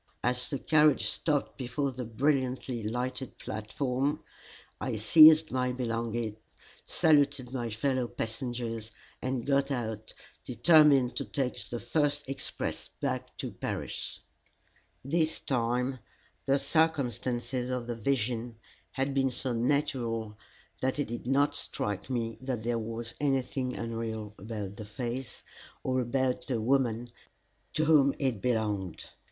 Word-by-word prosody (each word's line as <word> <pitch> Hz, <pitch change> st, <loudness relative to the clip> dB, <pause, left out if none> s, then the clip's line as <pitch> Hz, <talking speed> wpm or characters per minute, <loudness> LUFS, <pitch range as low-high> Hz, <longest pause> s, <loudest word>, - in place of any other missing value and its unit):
As 125 Hz, 0 st, 0 dB
the 140 Hz, -, -1 dB
carriage 150 Hz, 0 st, +4 dB
stopped 150 Hz, -3 st, 0 dB
before 135 Hz, +2 st, -1 dB
the 125 Hz, -1 st, -5 dB
brilliantly 130 Hz, 0 st, 0 dB
lighted 125 Hz, +3 st, -3 dB
platform, 130 Hz, +6 st, -2 dB, 0.6 s
I 125 Hz, -3 st, -2 dB
seized 155 Hz, +8 st, +8 dB
my 125 Hz, -1 st, +1 dB
belongings, 115 Hz, -2 st, -2 dB, 0.5 s
saluted 140 Hz, -5 st, +3 dB
my 120 Hz, -3 st, -2 dB
fellow 130 Hz, +3 st, 0 dB
passengers, 115 Hz, -1 st, -4 dB, 0.3 s
and 130 Hz, -2 st, -2 dB
got 140 Hz, 0 st, +2 dB
out, 110 Hz, -5 st, -3 dB, 0.3 s
determined 140 Hz, 0 st, +5 dB
to -, -, -1 dB
take 130 Hz, -3 st, -2 dB
the 120 Hz, -, -3 dB
first 145 Hz, +4 st, 0 dB
express 135 Hz, 0 st, -4 dB
back -, -, -3 dB
to -, -, -4 dB
Paris. -, -, -4 dB, 0.8 s
This 160 Hz, +2 st, +1 dB
time 125 Hz, +1 st, 0 dB, 0.5 s
the 135 Hz, +1 st, +4 dB
circumstances 130 Hz, -6 st, 0 dB
of 125 Hz, -2 st, -2 dB
the 120 Hz, -, -3 dB
vision 120 Hz, -1 st, -1 dB, 0.4 s
had 135 Hz, +1 st, 0 dB
been 135 Hz, -1 st, +2 dB
so 125 Hz, 0 st, -2 dB
natural 115 Hz, -3 st, 0 dB, 0.5 s
that 130 Hz, +2 st, 0 dB
it 145 Hz, -, -1 dB
did 120 Hz, +1 st, -5 dB
not 140 Hz, +2 st, +3 dB
strike 105 Hz, +3 st, -3 dB
me 115 Hz, -3 st, -2 dB
that 130 Hz, -4 st, -3 dB
there 120 Hz, 0 st, 0 dB
was 115 Hz, +1 st, -4 dB
anything 135 Hz, -2 st, 0 dB
unreal 115 Hz, -2 st, -4 dB
about 105 Hz, -1 st, -5 dB
the 105 Hz, -, -6 dB
face, 120 Hz, +3 st, -5 dB, 0.4 s
or 130 Hz, 0 st, +1 dB
about 130 Hz, +1 st, 0 dB
the 125 Hz, -4 st, 0 dB
woman 120 Hz, -1 st, +1 dB, 0.6 s
to 155 Hz, -, +2 dB
whom 145 Hz, -3 st, +5 dB
it 130 Hz, -8 st, -1 dB
belonged. 105 Hz, -7 st, -1 dB
125 Hz, 125 wpm, -30 LUFS, 115-135 Hz, 0.8 s, seized